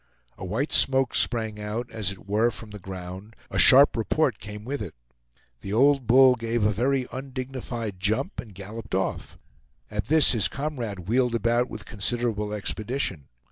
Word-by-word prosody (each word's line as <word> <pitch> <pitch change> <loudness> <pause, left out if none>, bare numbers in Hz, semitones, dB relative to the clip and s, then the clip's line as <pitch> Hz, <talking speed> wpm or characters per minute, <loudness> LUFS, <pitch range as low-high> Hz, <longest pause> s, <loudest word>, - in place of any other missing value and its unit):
A - - -10
white 110 - -2
smoke 135 -2 +4
sprang 110 -3 +2
out, 110 +4 -5
as 105 -4 -2
it 95 0 -12
were 110 +4 +2
from 110 -2 -9
the 105 - -9
ground; 95 +3 -9 0.2
a - - -1
sharp 140 +2 +7
report 120 +3 0
came 105 0 -9
with 140 +1 -4
it. 95 -10 -7 0.6
The 100 - -6
old 135 +1 +3
bull 130 +2 +7
gave 115 -1 -2
a 105 - +3
very 130 +5 0
undignified 130 -5 -6
jump 110 - -1
and 110 -6 -8
galloped 105 +2 -7
off. 95 0 -3 0.5
At 105 -2 -3
this 155 0 +5
his 110 -4 +3
comrade 120 - -5
wheeled 125 +1 +1
about 120 +2 +1
with 105 -1 -8
considerable 105 0 -2
expedition. 105 - -2
115 Hz, 165 wpm, -25 LUFS, 105-130 Hz, 0.6 s, sharp